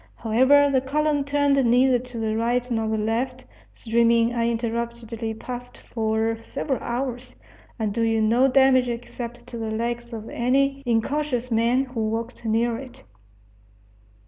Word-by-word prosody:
However, 260 +6 +4
the 260 -1 +3
column 295 +2 0
turned 285 -1 +2
neither 250 +1 +4
to 250 -1 -9
the 220 -1 -1
right 240 +2 0
nor 225 -1 0
the 220 0 0
left, 245 +4 -2 0.3
streaming 235 0 +2
uninterruptedly 235 -1 -2
past 245 +2 -8
for 225 0 -1
several 265 +3 -3
hours, 250 0 -4 0.4
and 215 -3 -2
doing 225 -1 +1
no 245 +4 +4
damage 265 -1 +4
except 240 0 -6
to 245 -1 -8
the 225 -1 -3
legs 235 +2 -3
of 225 -1 -7
any 275 +3 +1
incautious 250 +1 0
man 235 +4 +2
who 250 -3 -6
walked 230 +2 -4
near 225 +1 +1
it. 260 -2 -12
240 Hz, 140 wpm, -24 LUFS, 225-255 Hz, 0.4 s, However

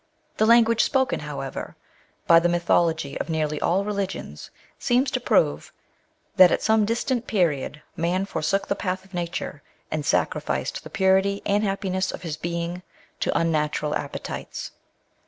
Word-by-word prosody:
The 215 - +3
language 230 -1 +5
spoken, 265 -1 +1
however,, 140 -2 -6 0.5
by 165 0 +7
the 175 +1 +1
mythology 170 -3 +1
of - - -4
nearly 155 -2 -1
all 190 +3 +1
religions 200 -2 -4 0.3
seems 255 +2 +2
to 255 - 0
prove, 245 - +1 0.7
that 185 -2 +8
at - - 0
some 220 -1 +3
distant 235 +2 -1
period 155 -7 0
man 180 +3 0
forsook 195 +1 -1
the - - +1
path 185 -1 -3
of 195 - -22
nature, 170 -4 -4 0.3
and 155 -1 -1
sacrificed - - -1
the - - -9
purity 190 +1 +2
and 205 +1 +2
happiness 195 -2 -1
of - - -8
his 160 -3 -3
being 170 +2 -4 0.4
to - - -1
mmatural 150 -2 0
appetites. 140 - -5
185 Hz, 145 wpm, -24 LUFS, 160-200 Hz, 0.7 s, that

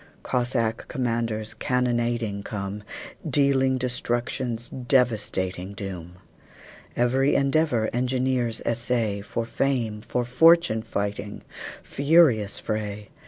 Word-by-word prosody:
Cossack 120 -3 -1
commanders 115 -3 -2
cannonading 120 -4 0
come, 100 0 -5 0.5
Dealing 135 -2 +3
destruction's 120 -1 -2
devastating 110 -7 0
doom. 90 -3 -7 0.8
Every 130 +3 +2
endeavor 140 -5 +2
engineers 125 -1 0
essay, 115 -3 0
For 115 +3 -3
fame, 115 -4 -1
for 120 +2 -2
fortune 165 -1 +5
fighting 105 -2 -4 0.4
furious 140 -8 +3
fray! 105 -1 -4
120 Hz, 85 wpm, -25 LUFS, 105-130 Hz, 0.8 s, fortune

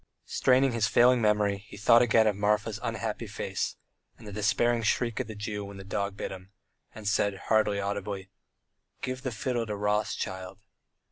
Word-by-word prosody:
straining 130 +1 +3
his 115 -3 +1
failing 120 +2 +5
memory 105 -2 +2
he - - -11
thought 115 +3 +6
again 115 -2 +4
of 105 -2 +2
Marfa's 105 +1 0
unhappy 115 -1 -3
face, 100 -2 -3 0.4
and 115 - -14
the 105 - -7
despairing 110 +3 +2
shriek 115 +2 0
of 130 - -2
the 110 - -7
Jew 105 0 -4
when 100 0 -9
the 95 - -8
dog 100 0 -3
bit - - -4
him, 95 0 -9 0.5
and 110 -2 -7
said, 100 -1 +1
hardly 105 -2 +3
audibly, 100 -1 -4 0.7
"Give 130 0 -3
the 130 - -3
fiddle 120 +1 -2
to 105 - -3
Rothschild." 100 -2 -2
105 Hz, 175 wpm, -28 LUFS, 100-115 Hz, 0.7 s, thought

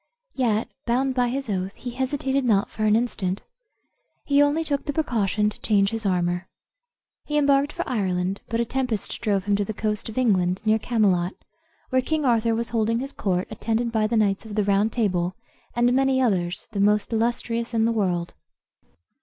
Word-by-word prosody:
Yet, 230 -4 +1 0.2
bound 260 +3 +1
by 250 -1 +2
his 270 +2 -3
oath, 190 -1 -2
he 245 - -6
hesitated 270 +1 -1
not 210 -5 +2
for 215 - -2
an 210 0 +4
instant. 205 -5 -1 0.8
He 285 0 +4
only 290 +3 +3
took 285 -3 -2
the 290 - -2
precaution 215 - +1
to - - -12
change 200 -2 +2
his 225 -2 -2
armor. 175 0 0 0.8
He 295 - -1
embarked 280 0 +3
for - - -4
Ireland; 190 -4 -1
but 230 - -1
a 235 - +2
tempest 245 -4 -2
drove 200 -4 +1
him 205 0 +1
to 205 - +1
the 215 +1 -5
coast 215 +1 -2
of 220 - -9
England, 185 -7 +2
near 220 0 +3
Camelot, 200 -6 +1 0.6
where 260 0 +3
King 310 +2 -1
Arthur 230 -2 +2
was 235 +1 -2
holding 230 0 +1
his 270 +3 -4
court, 185 -2 -1
attended 225 +2 -1
by 220 -2 +1
the 230 +1 0
knights 200 -3 +1
of 215 -2 -8
the 210 - +2
Round 200 +2 +2
Table, 185 -6 0 0.4
and 240 +1 +3
many 265 0 +3
others, 185 -8 0
the 205 - -3
most 210 +3 +2
illustrious 235 +1 -1
in 225 0 +3
the 230 - +2
world. 180 -6 -1
220 Hz, 185 wpm, -24 LUFS, 200-250 Hz, 0.8 s, an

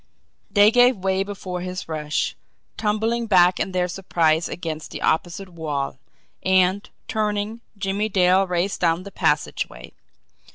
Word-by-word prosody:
They 205 +1 +6
gave 245 0 +5
way 190 0 0
before 190 -3 -6
his 185 0 -5
rush, 155 -2 -2 0.4
tumbling 225 +2 0
back 180 -3 +5
in 195 - -1
their 180 -1 0
surprise 170 -3 +1
against 160 -3 -5
the - - -7
opposite 175 +4 -1
wall; 150 -6 -4 0.4
and, 190 +1 +2 0.2
turning, 215 +1 -2 0.2
Jimmie 200 +2 -1
Dale 185 0 +3
raced 180 +2 -1
down 170 0 +2
the 200 - -9
passageway. 150 - -1
185 Hz, 130 wpm, -23 LUFS, 170-205 Hz, 0.4 s, They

